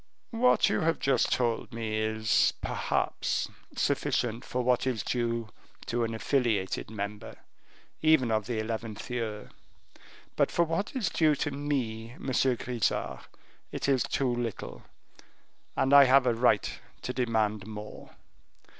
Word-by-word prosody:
"What 250 +2 +4
you - - +1
have 165 +1 +2
just 135 -3 +1
told 120 -2 0
me 110 -2 -3
is, 110 0 +2
perhaps, - - -1 0.3
sufficient 120 +1 0
for 125 -1 -2
what 125 +1 +2
is 120 -6 -1
due 115 -2 -1 0.4
to 120 0 -1
an 115 0 -2
affiliated 110 -7 0
member, 105 -1 -6 0.7
even 155 -7 +4
of 110 -2 0
the 120 -2 -2
eleventh 110 0 -4
year; 110 -4 -4 0.8
but - - +3
for 170 - +2
what 165 - -2
is 230 -8 0
due 155 -2 +3
to 145 - -2
me, 125 -5 -3
Monsieur 130 -1 +1
Grisart, 120 -2 -2 0.4
it - - -3
is 135 -3 +3
too 130 0 0
little, 120 -3 -4 1.0
and 135 +1 +2
I 140 -1 +10
have 130 0 +5
a 120 - +3
right 115 -3 +2 0.2
to 125 - -3
demand 110 -5 0
more. 105 -1 -9
120 Hz, 135 wpm, -29 LUFS, 110-135 Hz, 1.0 s, I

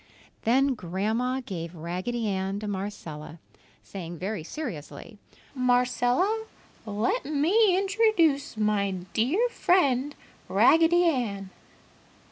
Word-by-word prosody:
Then 265 +4 +3
Grandma 220 +7 -2
gave 170 -3 -6
Raggedy 185 +8 -3
Ann 195 0 -2
to 210 - -5
Marcella, 170 -6 -6 0.5
saying 175 -3 -7
very 190 0 -4
seriously, 190 - -7 0.3
"Marcella, 250 - +1 0.4
let 210 +2 0
me 355 +8 +3
introduce 385 - +2
my 210 -2 +1
very 180 -1 -7
dear 335 - +2
friend, 290 - +2 0.3
Raggedy 330 +2 +5
Ann. 220 - -1
240 Hz, 95 wpm, -27 LUFS, 195-305 Hz, 0.5 s, Raggedy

